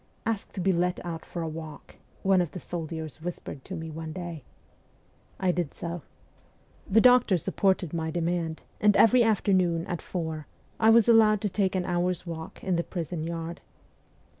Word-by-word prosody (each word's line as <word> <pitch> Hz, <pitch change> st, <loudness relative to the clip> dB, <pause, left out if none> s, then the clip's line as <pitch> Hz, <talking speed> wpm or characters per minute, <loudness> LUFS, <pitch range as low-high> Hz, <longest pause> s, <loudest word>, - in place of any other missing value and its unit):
' -, -, -37 dB
Ask 225 Hz, -3 st, -2 dB
to -, -, -5 dB
be 190 Hz, +1 st, +2 dB
let 180 Hz, +1 st, 0 dB
out 165 Hz, -2 st, -5 dB
for 170 Hz, -, -5 dB
a -, -, -2 dB
walk,' 155 Hz, -2 st, -8 dB, 0.3 s
one 190 Hz, -1 st, +4 dB
of 175 Hz, -, -3 dB
the 180 Hz, -, -5 dB
soldiers 160 Hz, -2 st, -6 dB
whispered 165 Hz, -5 st, -6 dB
to 190 Hz, -, -6 dB
me 160 Hz, -1 st, -6 dB
one 160 Hz, 0 st, -6 dB
day. 170 Hz, -4 st, -6 dB, 1.0 s
I 185 Hz, -1 st, +2 dB
did 175 Hz, -4 st, -2 dB
so. 170 Hz, 0 st, -5 dB, 0.9 s
The 220 Hz, +3 st, +5 dB
doctor 250 Hz, -6 st, +6 dB
sup 165 Hz, -, -5 dB
ported 190 Hz, -4 st, +2 dB
my 160 Hz, -1 st, -1 dB
demand, 165 Hz, -1 st, -2 dB, 0.2 s
and 210 Hz, -1 st, +4 dB
every 240 Hz, +2 st, +6 dB
afternoon, 185 Hz, -6 st, +2 dB
at 175 Hz, -, -4 dB
four, 160 Hz, -4 st, -4 dB, 0.3 s
I 220 Hz, -, +5 dB
was 230 Hz, 0 st, +6 dB
allowed 220 Hz, -2 st, +6 dB
to 210 Hz, -, 0 dB
take 190 Hz, 0 st, 0 dB
an 180 Hz, -1 st, 0 dB
hour's 180 Hz, 0 st, 0 dB
walk 165 Hz, -1 st, -7 dB
in 185 Hz, -2 st, +1 dB
the 170 Hz, -, 0 dB
prison 170 Hz, -2 st, -4 dB
yard. 165 Hz, 0 st, -5 dB
175 Hz, 185 wpm, -27 LUFS, 165-190 Hz, 1.0 s, doctor